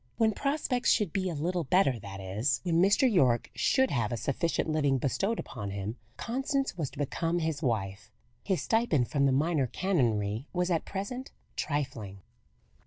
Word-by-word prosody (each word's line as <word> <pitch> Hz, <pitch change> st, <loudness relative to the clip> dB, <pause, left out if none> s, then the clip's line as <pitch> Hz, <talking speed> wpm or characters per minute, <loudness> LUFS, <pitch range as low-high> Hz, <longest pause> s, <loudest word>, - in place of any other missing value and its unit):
When 225 Hz, -2 st, +4 dB
prospects 275 Hz, 0 st, 0 dB
should 210 Hz, -8 st, +2 dB
be 190 Hz, -1 st, 0 dB
a 170 Hz, -, -4 dB
little 170 Hz, +4 st, -1 dB
better 135 Hz, -6 st, +3 dB
that 100 Hz, -1 st, -8 dB
is, 105 Hz, +8 st, 0 dB
when 170 Hz, -2 st, +2 dB
Mr. 205 Hz, +8 st, +5 dB
Yorke 130 Hz, -, +3 dB
should 265 Hz, 0 st, +2 dB
have 115 Hz, -5 st, 0 dB
a 120 Hz, -, -1 dB
sufficient 145 Hz, +9 st, -1 dB
living 145 Hz, -4 st, +2 dB
bestowed 195 Hz, -, 0 dB
upon 100 Hz, -1 st, -5 dB
him 100 Hz, +3 st, -4 dB, 0.2 s
Constance 270 Hz, +2 st, -1 dB
was 155 Hz, -6 st, -2 dB
to -, -, -15 dB
become 165 Hz, +4 st, -1 dB
his 160 Hz, -3 st, -1 dB
wife. 105 Hz, -6 st, -2 dB, 0.3 s
His 190 Hz, -3 st, 0 dB
stipend 220 Hz, -, +2 dB
from 140 Hz, -2 st, +2 dB
the -, -, +3 dB
minor 145 Hz, 0 st, +2 dB
canonry 115 Hz, -, 0 dB
was 180 Hz, 0 st, 0 dB
at 165 Hz, -, +1 dB
present 225 Hz, +7 st, -5 dB, 0.3 s
trifling. 115 Hz, -, -3 dB
155 Hz, 170 wpm, -30 LUFS, 120-195 Hz, 0.3 s, Mr